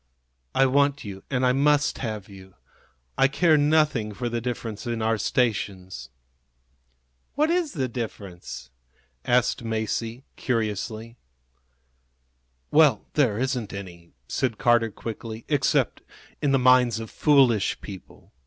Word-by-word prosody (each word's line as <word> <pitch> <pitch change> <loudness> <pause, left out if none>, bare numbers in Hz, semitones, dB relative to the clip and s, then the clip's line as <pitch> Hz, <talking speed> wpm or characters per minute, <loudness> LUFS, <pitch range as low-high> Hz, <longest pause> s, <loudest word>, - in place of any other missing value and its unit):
I 135 - +5
want 140 +1 +2
you, 95 -2 -8
and 130 -1 +1
I 125 - +4
must 145 +2 +2
have 110 -5 -4
you. 95 -2 -14 0.6
I 135 - +6
care 160 +3 +3
nothing 145 -8 +2
for 120 +1 -3
the 120 0 -2
difference 115 -2 -5
in 115 -1 -2
our 110 0 0
stations." 95 - -1 1.3
"What 305 +3 +2
is 345 -4 0
the 135 -6 -1
difference?" 100 - -7 0.5
asked 125 -1 +2
Masie, 115 +2 -3
curiously. 115 0 -3 1.5
"Well, 145 -8 +4
there 125 -9 +2
isn't 125 -3 -2
any," 85 -4 -9
said 120 - -1
Carter, 120 -2 +3
quickly, 110 +1 -7
"except 145 -3 +1 0.4
in 145 - +1
the 135 - +4
minds 125 -3 +4
of 110 -1 -7
foolish 130 -9 +3
people. 95 -3 -12
120 Hz, 125 wpm, -25 LUFS, 105-135 Hz, 1.5 s, I